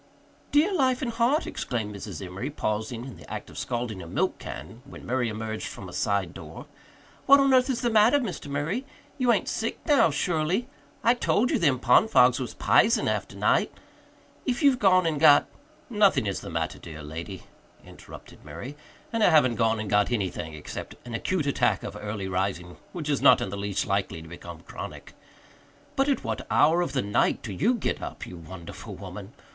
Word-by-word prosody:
"Dear 315 Hz, +7 st, +3 dB
life 265 Hz, -5 st, +2 dB
and 240 Hz, -, -1 dB
heart!" 235 Hz, +7 st, +2 dB
exclaimed 110 Hz, -4 st, -4 dB
Mrs. 100 Hz, 0 st, -7 dB
Emory, 95 Hz, +9 st, -5 dB
pausing 110 Hz, -2 st, -3 dB
in 130 Hz, -, -9 dB
the -, -, -14 dB
act -, -, -6 dB
of -, -, -12 dB
scalding 120 Hz, -5 st, -3 dB
a 85 Hz, -, -9 dB
milk -, -, -1 dB
can 80 Hz, -, -8 dB
when 140 Hz, -, -12 dB
Murray 125 Hz, -1 st, 0 dB
emerged 110 Hz, 0 st, -4 dB
from 95 Hz, -, -8 dB
a 90 Hz, -, -10 dB
side 100 Hz, -5 st, 0 dB
door. -, -, -10 dB, 0.6 s
"What 280 Hz, +1 st, +8 dB
on 275 Hz, -1 st, +4 dB
earth 255 Hz, +1 st, +4 dB
is 255 Hz, -, -1 dB
the 240 Hz, -2 st, +1 dB
matter, 220 Hz, +5 st, +5 dB
Mr. 225 Hz, -, -4 dB
Murray? 150 Hz, -, -2 dB, 0.4 s
You 250 Hz, -2 st, +4 dB
ain't 205 Hz, -5 st, +1 dB
sick 225 Hz, -, -2 dB
now, 290 Hz, -, +5 dB
surely? 160 Hz, -, 0 dB, 0.4 s
I 235 Hz, -, +5 dB
told 245 Hz, -1 st, +1 dB
you -, -, +2 dB
them 145 Hz, -6 st, +3 dB
pond 125 Hz, -, +4 dB
fogs 125 Hz, -, +5 dB
was 125 Hz, -, -5 dB
p'isen 230 Hz, -, +3 dB
after -, -, -2 dB
night! -, -, +2 dB, 0.7 s
If 245 Hz, 0 st, -1 dB
you've 275 Hz, -3 st, +5 dB
gone 185 Hz, -3 st, +4 dB
and 155 Hz, -3 st, 0 dB
got 145 Hz, -2 st, +7 dB, 0.3 s
" -, -, -31 dB
"Nothing 210 Hz, -, +3 dB
is 100 Hz, -2 st, -2 dB
the -, -, -8 dB
matter, 80 Hz, -2 st, -3 dB
dear 80 Hz, -2 st, -9 dB
lady," 85 Hz, +6 st, -7 dB, 0.4 s
interrupted -, -, -13 dB
Murray, 85 Hz, -, -8 dB, 0.4 s
"and 225 Hz, -1 st, +1 dB
I -, -, +6 dB
haven't 150 Hz, -7 st, +5 dB
gone 115 Hz, 0 st, +2 dB
and 110 Hz, -, -4 dB
got 105 Hz, +1 st, +2 dB
anything 90 Hz, -8 st, -2 dB
except 75 Hz, -, -7 dB
an 120 Hz, -, -8 dB
acute 160 Hz, +6 st, -1 dB
attack 140 Hz, -, +1 dB
of -, -, -6 dB
early 105 Hz, -2 st, -5 dB
rising 90 Hz, -2 st, -2 dB
which 165 Hz, -4 st, -6 dB
is 145 Hz, -2 st, 0 dB
not -, -, +7 dB
in -, -, -3 dB
the 100 Hz, -, -5 dB
least 100 Hz, -1 st, -2 dB
likely 95 Hz, -5 st, -2 dB
to -, -, -12 dB
become 85 Hz, 0 st, -10 dB
chronic. -, -, -9 dB, 0.8 s
But 270 Hz, +1 st, +2 dB
at 275 Hz, -, 0 dB
what -, -, -4 dB
hour 170 Hz, +3 st, +4 dB
of 175 Hz, -, -2 dB
the 135 Hz, -, 0 dB
night 100 Hz, 0 st, +1 dB
do 105 Hz, -, -5 dB
you 235 Hz, -, +2 dB
get 230 Hz, -, -2 dB
up, -, -, -6 dB
you 90 Hz, -, -9 dB
wonderful 85 Hz, +1 st, -9 dB
woman? -, -, -9 dB
125 Hz, 200 wpm, -26 LUFS, -, 0.8 s, What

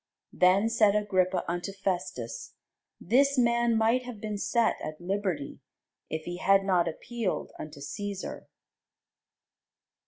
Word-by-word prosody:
Then 185 Hz, +4 st, +4 dB
said 215 Hz, -3 st, +4 dB
Agrippa 185 Hz, -3 st, +1 dB
unto 175 Hz, +3 st, -3 dB
Festus, 180 Hz, -, -4 dB, 0.4 s
This 275 Hz, +8 st, +3 dB
man 235 Hz, -1 st, +3 dB
might 225 Hz, +3 st, +3 dB
have 245 Hz, -4 st, -8 dB
been 210 Hz, -1 st, -4 dB
set 235 Hz, +2 st, +2 dB
at 155 Hz, 0 st, -6 dB
liberty, 185 Hz, -5 st, -3 dB, 0.5 s
if 160 Hz, 0 st, -3 dB
he 175 Hz, +2 st, -5 dB
had 195 Hz, +1 st, +4 dB
not 180 Hz, -3 st, +2 dB
appealed 220 Hz, +4 st, -3 dB
unto 150 Hz, -2 st, -8 dB
Cæsar. 200 Hz, +7 st, -5 dB
195 Hz, 120 wpm, -28 LUFS, 175-225 Hz, 0.5 s, Then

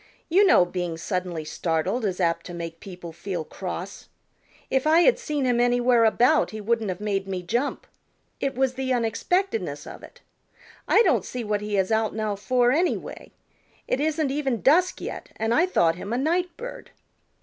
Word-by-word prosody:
"You 390 Hz, +5 st, +5 dB
know 180 Hz, -, +6 dB
being 175 Hz, -2 st, -4 dB
suddenly 175 Hz, -2 st, -3 dB
startled 175 Hz, +9 st, -1 dB
is 190 Hz, -2 st, -2 dB
apt 170 Hz, -2 st, 0 dB
to 175 Hz, -, -7 dB
make 165 Hz, -1 st, -6 dB
people 175 Hz, -3 st, -9 dB
feel 175 Hz, 0 st, -4 dB
cross. 185 Hz, +3 st, -7 dB, 0.6 s
If 265 Hz, +2 st, +1 dB
I 320 Hz, +2 st, +6 dB
had -, -, +4 dB
seen 300 Hz, -, -2 dB
him 245 Hz, -1 st, +2 dB
anywhere 245 Hz, -1 st, +3 dB
about 245 Hz, +7 st, +3 dB
he 215 Hz, -, -7 dB
wouldn't 220 Hz, 0 st, 0 dB
have 180 Hz, 0 st, -4 dB
made 195 Hz, -2 st, -1 dB
me 185 Hz, -2 st, -4 dB
jump. 240 Hz, +10 st, -2 dB, 0.5 s
It 275 Hz, -1 st, -2 dB
was 265 Hz, 0 st, +1 dB
the 260 Hz, 0 st, -3 dB
unexpectedness 360 Hz, -, -1 dB
of -, -, -10 dB
it. -, -, -15 dB, 0.7 s
I 460 Hz, -, +5 dB
don't -, -, +2 dB
see 250 Hz, -1 st, -5 dB
what 210 Hz, -1 st, -1 dB
he 210 Hz, -1 st, -2 dB
is 190 Hz, +2 st, +1 dB
out 220 Hz, -1 st, +1 dB
now 215 Hz, -2 st, -1 dB
for, 245 Hz, +4 st, +2 dB
anyway, 340 Hz, +6 st, -1 dB, 0.6 s
It -, -, 0 dB
isn't 305 Hz, -1 st, 0 dB
even 270 Hz, -5 st, -1 dB
dusk 350 Hz, +7 st, +3 dB
yet, -, -, -6 dB
and 225 Hz, +1 st, 0 dB
I 340 Hz, +8 st, +3 dB
thought 165 Hz, -, +2 dB
him 200 Hz, +3 st, -6 dB
a -, -, 0 dB
night 335 Hz, +5 st, 0 dB
bird." -, -, -8 dB
230 Hz, 185 wpm, -25 LUFS, 185-280 Hz, 0.7 s, know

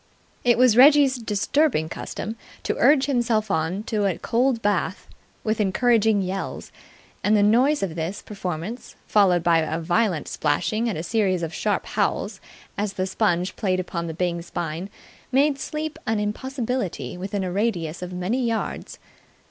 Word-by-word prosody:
It 240 Hz, -1 st, +4 dB
was 250 Hz, -3 st, +5 dB
Reggie's 275 Hz, +1 st, +6 dB
disturbing 220 Hz, -, +1 dB
custom 215 Hz, +6 st, -5 dB, 0.3 s
to -, -, -1 dB
urge 275 Hz, +1 st, +5 dB
himself 235 Hz, -6 st, +1 dB
on 170 Hz, +6 st, -1 dB
to 210 Hz, -2 st, 0 dB
a 185 Hz, -, -1 dB
cold 245 Hz, +1 st, +1 dB
bath 185 Hz, -3 st, -1 dB, 0.4 s
with 215 Hz, 0 st, 0 dB
encouraging 220 Hz, 0 st, +3 dB
yells; 190 Hz, +1 st, -5 dB, 0.5 s
and 210 Hz, +1 st, +4 dB
the 205 Hz, -, +4 dB
noise 255 Hz, +7 st, +3 dB
of 185 Hz, -5 st, -2 dB
this 165 Hz, +4 st, -4 dB
performance, 195 Hz, +3 st, -6 dB
followed 185 Hz, -5 st, +3 dB
by 165 Hz, -2 st, +2 dB
violent 175 Hz, +1 st, 0 dB
splashing 215 Hz, +10 st, 0 dB
and 195 Hz, -, -3 dB
a 160 Hz, -, -3 dB
series 190 Hz, -3 st, +1 dB
of 165 Hz, -, -4 dB
sharp -, -, -1 dB
howls -, -, -1 dB, 0.4 s
as 205 Hz, -1 st, -1 dB
the 185 Hz, -, -1 dB
sponge 185 Hz, -2 st, 0 dB
played 185 Hz, -3 st, 0 dB
upon 170 Hz, -2 st, -3 dB
the 160 Hz, -, -5 dB
Byng 175 Hz, -1 st, -1 dB
spine, 170 Hz, +1 st, -5 dB, 0.4 s
made 275 Hz, +2 st, +3 dB
sleep 305 Hz, +2 st, -4 dB
an 220 Hz, -1 st, +1 dB
impossibility 220 Hz, -, -3 dB
within 190 Hz, +2 st, -3 dB
a 185 Hz, -, -3 dB
radius 180 Hz, -6 st, -1 dB
of 180 Hz, 0 st, -5 dB
many 185 Hz, +8 st, -1 dB
yards. 230 Hz, -2 st, -3 dB
205 Hz, 155 wpm, -24 LUFS, 175-235 Hz, 0.5 s, Reggie's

